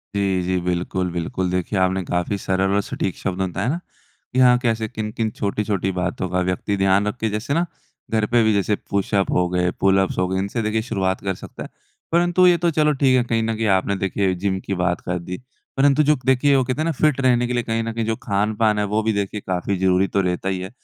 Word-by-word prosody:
जी, 95 -2 +1
जी, 90 +1 0
बिल्कुल, 90 +1 -2
बिल्कुल। 90 +2 -2
देखिए, 90 +3 -1
आपने 95 +1 +1
काफ़ी 90 +3 -1
सरल 95 0 0
और 100 - +3
सटीक 95 -1 -3
शब्द 95 -1 -3
में 95 -1 -1
बताया 100 +6 -2
ना 165 +5 -1 0.5
कि 130 - +1
हाँ, 125 -1 +6
कैसे 115 -3 0
किन-किन 110 +1 -3
छोटी-छोटी 100 -2 -1
बातों 90 0 -2
का 90 +1 0
व्यक्ति 95 +3 -1
ध्यान 95 +1 +3
रखे। 110 +1 -2
जैसे 105 +7 -2
ना, 170 +3 +2 0.5
घर 110 -1 +2
पे 120 +1 +3
भी 110 0 +3
जैसे 100 +1 +1
पुशअप 100 0 0
हो 90 0 +2
गए, 90 0 +1
पुलअप्स 95 0 +2
हो 95 - +1
गए, 95 +1 -1
इनसे 100 +4 -2
देखिए 110 0 0
शुरुआत 95 -5 -1
कर 95 -1 -1
सकता - - -9
है। - - -9 0.4
परंतु 175 +2 +4
ये 175 -1 +5
तो 170 +1 +1
चलो, 150 -1 +2
ठीक 135 -2 +3
है, 125 - +3
कहीं 115 -1 0
ना 115 0 -1
कहीं 110 0 -1
आपने 100 +1 -1
देखिए 95 0 0
जिम 95 +1 -1
की - - -2
बात 90 0 0
कर 90 0 -3
दी। 90 +2 -6 0.4
परंतु 140 +2 +4
जो 150 +1 +4
क 130 - -14
देखिए, 130 +2 +4
वो 135 - +3
कहते 130 +4 -2
है - - 0
ना 165 - +1
फिट 150 -2 +1
रहने 125 -2 +3
के 125 - -2
लिए 120 -1 0
कहीं 115 0 -1
ना 115 - -3
कहीं 115 0 -2
जो 110 0 0
खान-पान 105 +1 +1
है, 105 - +1
वो 105 +2 0
भी 110 0 +1
देखिए 100 +1 -2
काफ़ी 95 +2 -1
जरूरी 95 +1 +2
तो 100 - +4
रहता 90 +1 -1
ही 95 -1 -2
है। 95 - -6
100 Hz, 245 wpm, -21 LUFS, 95-120 Hz, 0.5 s, हाँ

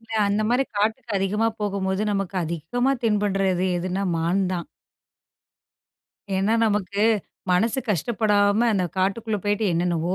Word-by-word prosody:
இல்ல 225 -2 -1 0.2
நம்ம 215 +3 +1
அதி, 270 - +1
காட்டுக்குப் 220 -1 0
போகும் 200 -2 -2
போது 190 +1 -1 0.4
அதி, 165 +1 -2 0.2
நமக்கு 250 +3 +2
தென்படுவது 190 -4 +1 0.2
மான் 175 +4 +1
தான். 175 -2 -3 1.7
ஏன்னா 200 +4 +2
நமக்கு 205 -1 0 0.5
மனசு 215 +8 +2
கஷ்டப்படாம 210 +3 +2
அந்த 190 -3 +1
காட்டுக்குள்ள 210 +3 0
போயிட்டு 205 +1 0
என்னென்னவோ 170 +1 0
205 Hz, 110 wpm, -24 LUFS, 185-220 Hz, 1.7 s, நமக்கு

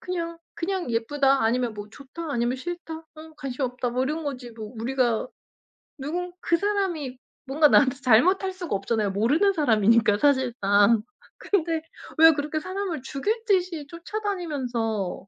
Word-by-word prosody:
그냥 335 -2 -4 0.2
그냥 360 -5 -3
예쁘다, 270 +3 +2
아니면 235 0 +1
뭐 205 0 -8
좋다, 285 +6 -8
아니면 240 -1 0
싫다, 345 +3 -6
어 320 0 -14
관심 270 -1 -5
없다 250 0 -2
뭐 250 +2 0
이런 305 +4 -2
거지 255 -4 -5
뭐 220 -1 -9
우리가 240 -1 0 0.7
누군 345 +6 -4
그 335 - +2
사람이 350 -10 -1 0.3
뭔가 295 +3 +4
나한테 270 -2 +4
잘못할 365 - +4
수가 355 - -4
없잖아요. 205 +1 -1
모르는 290 - +2
사람이니까 225 - +3
사실상. 230 -6 +3 0.4
근데 330 -5 0 0.4
왜 325 0 +9
그렇게 300 +1 -2
사람을 370 -4 -4
죽일 415 - -2
듯이 365 -7 +1
쫓아다니면서 290 - -3
285 Hz, 320 characters per minute, -25 LUFS, 235-335 Hz, 0.7 s, 왜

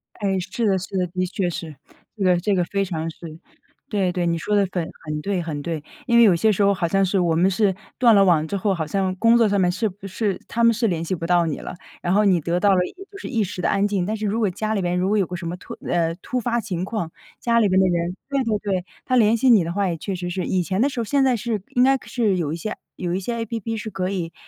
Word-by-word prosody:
哎， 195 -3 -1
是 190 +6 -3
的 195 -2 +3
是 190 +1 -5
的， 180 -1 +1
的 185 +1 -2
确 185 -2 -1
是。 160 -2 -6 0.4
这 200 - -2
个 180 -1 +4
这 200 +3 +1
个 180 - +2
非 195 +2 -1
常 165 -4 -3
是 - - -18 0.7
对 195 -4 +1
对， 175 -1 -1
你 170 -1 +1
说 210 +6 -1
得 200 -1 +3
很 175 -3 -2 0.2
很 150 0 -3
对 195 0 -1
很 155 -3 -4
对。 160 -1 -4 0.2
因 235 -2 +4
为 235 - +8
有 200 -6 +6
些 215 +6 +3
时 205 0 +1
候 200 0 +4
好 180 -3 -1
像 195 +3 +2
是 190 +1 +1
我 170 -2 +2
们 180 +4 +4
是 195 0 +1 0.2
断 235 -4 +6
了 195 - +6
网 160 -4 +3
之 200 - -2
后， 195 +1 +1
好 160 -4 -3
像 190 +1 -1
工 230 +4 +5
作 230 - +4
上 200 -1 +1
面 180 -1 +3
是 200 +5 -1
不 195 0 -9
是 200 +1 -2
他 235 - -1
们 230 0 +6
是 230 0 +1
联 170 -3 -1
系 175 - -2
不 165 -2 -3
到 175 -1 +3
你 160 - -3
了， - - -7 0.3
然 175 - -1
后 210 +2 +4
你 185 -4 +3
得 170 +3 0
到 200 0 +4
了 - - +3
也 - - -6 0.2
就 400 - -10
是 - - -6
一 230 -5 0
时 185 -1 -5
的 - - +1
安 200 +1 +2
静， 200 -3 0
但 215 +3 -2
是 215 - -3
如 210 +3 0
果 210 -4 +2
家 215 +4 -2
里 200 - 0
边 175 0 0
如 180 +1 +1
果 210 +2 +2
有 195 - +2
个 180 - -5
什 170 -1 -5
么 170 - -3
突 - - -10
呃， 165 -1 +1
突 250 +7 -3
发 235 0 0
情 185 -5 -3
况， 190 -4 -3 0.3
家 235 -1 +2
里 210 - +3
边 190 0 +3
的 190 - +4
人 175 +1 -1
对 275 -2 +1
对 220 -2 0
对， 190 -3 -2 0.2
他 255 - +1
联 225 -1 +4
系 255 +3 +3
你 210 -6 +6
的 170 - -3
话 200 +1 0
也 170 - -1
确 190 +4 -4
实 175 0 -4
是。 185 0 -2
以 185 -1 0
前 190 +4 -1
的 280 - +3
时 260 - -5
候 - - 0
现 275 +5 +2
在 260 -2 +3
是 225 -2 -2
应 245 - +5
该 270 +1 +4
是 215 -6 +1
有 155 -4 -1
一 - - -2
些 215 +5 -4 0.2
有 175 -1 -3
一 185 - 0
些 235 +5 -3
APP 225 0 -4
是 220 +1 -5
可 185 -1 -2
以 175 -4 -3
190 Hz, 330 characters per minute, -22 LUFS, 175-215 Hz, 0.7 s, 为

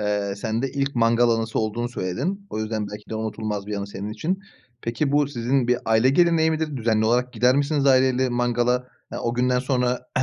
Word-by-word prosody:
eee, 105 -1 -1
sende 115 +5 -2
ilk 140 0 -2
mangal 120 0 +3
anısı 115 0 0
olduğunu 115 +2 -1
söyledin. 135 - -3
O - - -4
yüzden 110 -1 -2
belki 105 +1 -10
de 110 - -3
unutulmaz 110 -2 -3
bir 105 - -3
anı 100 0 -4
senin 100 +1 -6
için. 165 - -2 0.4
Peki 125 +5 -1
bu 145 -1 +3
sizin 125 -1 0
bir 125 0 +3
aile 110 +3 +3
geleneği 165 +1 +3
midir 155 -2 -2
düzenli 110 -2 +1
olarak 125 +2 +1
gider 125 +3 +3
misiniz 145 0 +1
aile 130 -1 +5
ile 130 +1 0
mangala? 120 +1 0 0.2
Eee, - - -4
o 120 - -2
günden 125 +1 +2
sonra 125 -1 -1
120 Hz, 200 wpm, -23 LUFS, 110-135 Hz, 0.4 s, aile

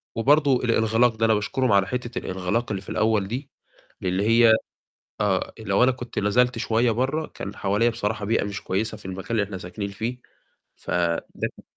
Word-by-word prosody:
وبرضه 140 +3 +4
الإنغلاق 115 0 +3
ده، 115 0 +1
أنا 110 - +4
باشكرهم 120 +4 0
على 100 -1 +4
حتّة 120 +1 -4
الإنغلاق 95 +6 -2
اللي 95 -2 -2
في - - -12
الأول 110 -3 +1
دي، 130 +6 -5 0.5
اللي 95 +2 0
هي 115 0 +6 0.7
آه، 100 -2 0
لو 100 +2 +2
أنا 130 - +5
كنت 125 -1 -5
نزلت 125 +4 +2
شوية 115 +1 +2
برّه، 135 +7 0
كان 100 +1 -8
حواليّا 105 +4 +1
بصراحة 105 -2 -2
بيئة 115 0 +1
مش 100 -1 -5
كويسة 110 +3 -2
في 105 - -17
المكان 95 +4 -6
اللي 110 -3 +2
إحنا 95 -1 -6
ساكنين 100 +3 -5
فيه، 115 +5 -4 0.6
فده 85 -1 -1 0.3
كان - - -15
110 Hz, 180 wpm, -24 LUFS, 100-120 Hz, 0.7 s, هي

